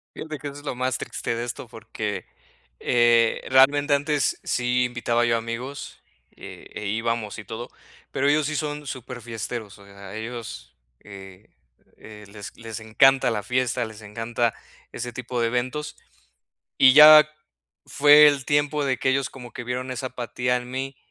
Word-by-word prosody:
Fíjate 155 -1 -7
que, 145 - -9
eso 140 0 -6
es - - -18
lo 135 - -4
más 130 0 -1
triste - - -4
de 115 - -3
esto 120 - -6
porque, - - -6 0.5
eh, 120 -1 +3
realmente, 145 +2 +5
antes 145 0 0
sí 125 0 0
invitaba 120 -1 0
yo 115 -1 +2
a - - +1
amigos, 120 +4 -7 0.3
eh, - - -11
e 105 - -6
íbamos 115 0 -2
y - - -11
todo, 110 +4 -7 0.4
pero 140 +1 +1
ellos 150 0 +2
sí 155 - -3
son 150 -1 -4
superfiesteros, 120 -4 -6
o 100 - -15
sea, 100 0 -12
ellos, 115 - -8 0.2
eh, 95 0 -13 0.5
eh, 105 -1 -13
les 100 0 -10
les 115 -2 -7
encanta 125 +3 +3
la 105 -2 -3
fiesta, 125 +2 -1
les 110 -1 -10
encanta 115 +2 -2 0.4
ese 120 -1 -6
tipo 125 -1 -4
de 115 - +2
eventos. 125 +5 -3 0.8
Y 130 -1 +7
ya 155 0 +10 0.6
fue 150 +1 +7
el 140 -2 -1
tiempo 145 0 +1
de 130 -3 0
que 130 - +1
ellos 135 +1 0
como 125 -3 -11
que 125 - -7
vieron 125 +2 -4
esa 130 +1 -4
apatía 125 0 -2
en 125 0 -6
mí 135 +1 -5
125 Hz, 170 wpm, -24 LUFS, 115-135 Hz, 0.8 s, ya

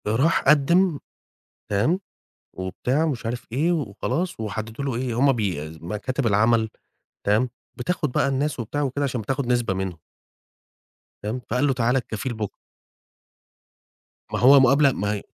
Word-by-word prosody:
ده 105 - +1
راح 150 +8 +3
قدِّم، 155 +3 +4 0.7
تمام؟ 130 - +2 0.5
وبتاع 125 - -1
ومش 135 -8 -2
عارف 120 +1 -4
إيه، 155 +8 +2
وخلاص 150 - -2
وحددوا 110 +4 -4
له 135 -3 -1
إيه 120 -1 -2
هم 140 +1 +5
بي 90 - -2
مكاتب 105 - -3
العمل 110 +2 +3 0.6
تمام، 110 +5 +3 0.3
بتاخد 150 +2 -2
بقى - - +2
الناس 140 +1 -1
وبتاع 120 +6 -2
وكده 140 +1 -1
عشان 125 -4 -1
بتاخد 135 +4 -2
نسبة 120 -5 +1
منهم. 95 -2 -3 1.3
فاهم؟ 110 +5 -3
فقال 125 +5 +2
له 135 - +2
تعالى 125 +1 +2
الكفيل 120 +1 -4
بُك 110 -3 -4 1.8
ما - - 0
هو 135 +3 +8
مقابلة 135 +2 +5
ما 105 -3 -1
هي 105 - -4
125 Hz, 145 wpm, -24 LUFS, 110-140 Hz, 1.8 s, هو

